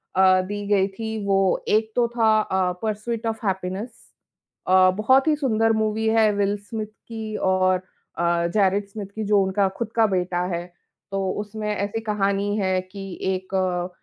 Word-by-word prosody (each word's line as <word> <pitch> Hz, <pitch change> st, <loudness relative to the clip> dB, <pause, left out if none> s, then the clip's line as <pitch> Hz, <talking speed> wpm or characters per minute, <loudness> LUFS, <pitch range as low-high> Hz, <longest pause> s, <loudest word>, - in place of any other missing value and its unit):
अ, 185 Hz, 0 st, +5 dB
दी 205 Hz, +2 st, -5 dB
गई 200 Hz, -2 st, +3 dB
थी, 220 Hz, +3 st, -5 dB
वो 195 Hz, -1 st, +2 dB
एक 220 Hz, +1 st, +2 dB
तो 240 Hz, -1 st, +3 dB
था 225 Hz, -2 st, +3 dB
अ, 190 Hz, -3 st, 0 dB
पर्स्यूट 220 Hz, +2 st, -3 dB
ऑफ 225 Hz, 0 st, -3 dB
हैप्पीनेस। 190 Hz, +3 st, -2 dB, 0.8 s
अ, 185 Hz, 0 st, +6 dB
बहुत 260 Hz, +7 st, +4 dB
ही 310 Hz, -, +4 dB
सुंदर 225 Hz, -6 st, +1 dB
मूवी 220 Hz, +1 st, -1 dB
है 220 Hz, -1 st, +4 dB
विल 200 Hz, 0 st, +1 dB
स्मिथ 220 Hz, -2 st, -4 dB
की 220 Hz, 0 st, -8 dB, 0.2 s
और 185 Hz, 0 st, +3 dB, 0.4 s
अ, 170 Hz, 0 st, +1 dB
जैरिट 200 Hz, -1 st, +2 dB
स्मिथ 205 Hz, 0 st, -6 dB
की 220 Hz, -, -3 dB
जो 205 Hz, -1 st, +4 dB
उनका 190 Hz, +1 st, +1 dB
खुद 230 Hz, -2 st, -3 dB
का 225 Hz, -1 st, +5 dB
बेटा 180 Hz, -2 st, -1 dB
है। 170 Hz, +1 st, -4 dB, 0.5 s
तो 195 Hz, -1 st, -1 dB
उसमें 210 Hz, +1 st, -5 dB
ऐसी 205 Hz, +2 st, -2 dB
कहानी 205 Hz, -1 st, 0 dB
है 190 Hz, -2 st, +1 dB
कि 195 Hz, +1 st, -9 dB, 0.3 s
एक 185 Hz, +1 st, -6 dB
अ, 180 Hz, -1 st, 0 dB
205 Hz, 170 wpm, -23 LUFS, 190-220 Hz, 0.8 s, अ